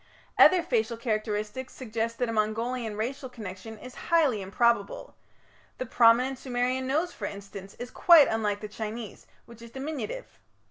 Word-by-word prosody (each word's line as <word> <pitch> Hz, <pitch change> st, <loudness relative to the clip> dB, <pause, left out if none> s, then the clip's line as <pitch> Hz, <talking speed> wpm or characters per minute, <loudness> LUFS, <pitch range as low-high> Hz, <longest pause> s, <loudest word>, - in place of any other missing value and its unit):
Other 365 Hz, -2 st, +7 dB
facial 230 Hz, -6 st, 0 dB
characteristics 215 Hz, +1 st, -3 dB
suggest 230 Hz, -2 st, -3 dB
that 245 Hz, -, 0 dB
a 230 Hz, -, -3 dB
Mongolian 225 Hz, +1 st, -1 dB
racial 260 Hz, +4 st, -3 dB
connection 220 Hz, -1 st, -8 dB
is 250 Hz, +4 st, -11 dB, 0.2 s
highly 300 Hz, -, +3 dB
improbable; 200 Hz, +2 st, 0 dB, 0.6 s
the 255 Hz, -, -3 dB
prominent 245 Hz, +3 st, +4 dB
Sumerian 255 Hz, 0 st, -1 dB
nose, 315 Hz, +6 st, 0 dB
for 205 Hz, -, -6 dB
instance, 200 Hz, -1 st, -9 dB
is 245 Hz, +1 st, -7 dB
quite 335 Hz, -5 st, +7 dB
unlike 210 Hz, -2 st, -1 dB
the 210 Hz, -, -5 dB
Chinese, 220 Hz, +1 st, -7 dB, 0.2 s
which 235 Hz, -1 st, -15 dB
is 235 Hz, -, -10 dB
diminutive. 305 Hz, -, -6 dB
235 Hz, 145 wpm, -28 LUFS, 215-260 Hz, 0.6 s, Other